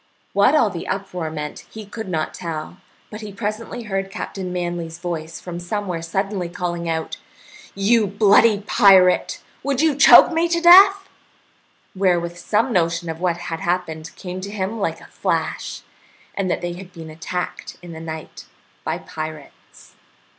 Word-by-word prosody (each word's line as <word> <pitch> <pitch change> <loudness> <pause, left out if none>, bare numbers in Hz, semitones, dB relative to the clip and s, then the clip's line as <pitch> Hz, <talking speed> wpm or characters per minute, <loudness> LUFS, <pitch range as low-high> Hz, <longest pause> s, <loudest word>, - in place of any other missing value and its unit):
What 200 +9 +4
all 230 -9 +3
the 170 - -6
uproar 185 -4 -3
meant 150 -1 -6
he 220 -1 -9
could 205 +2 -7
not 160 -3 -2
tell, 165 0 -6 0.3
but 215 +1 -7
he 210 -1 -7
presently 215 +4 -5
heard 195 -2 -3
Captain 195 -2 -5
Manly's 175 -2 -4
voice 165 -2 -5
from 175 -1 -7
somewhere 180 -1 -3
suddenly 190 +2 -2
calling 175 -1 -3
out, 160 0 -3 0.6
"You 210 +2 +3
bloody 205 +1 +4
pirate, 190 -3 +4 0.2
would 280 -2 -1
you 315 0 +3
choke 285 +4 +8
me 330 +1 +1
to 340 0 +1
death?" 390 +3 +7 0.9
wherewith 175 -3 +1
some 220 +7 0
notion 170 -1 0
of 160 - -8
what 175 -1 0
had 165 -1 -5
happened 165 -3 -3
came 185 -1 -7
to 200 - -6
him 205 +2 -3
like 200 - -2
a - - -13
flash, - - -3 0.5
and 195 -2 -2
that - - -1
they 175 0 -3
had 180 +1 -10
been 165 -2 -10
attacked 180 +3 -5
in 175 - -9
the 160 - -8
night 160 -1 -8 0.4
by - - -2
pirates. 155 -2 -9
185 Hz, 160 wpm, -21 LUFS, 170-210 Hz, 0.9 s, choke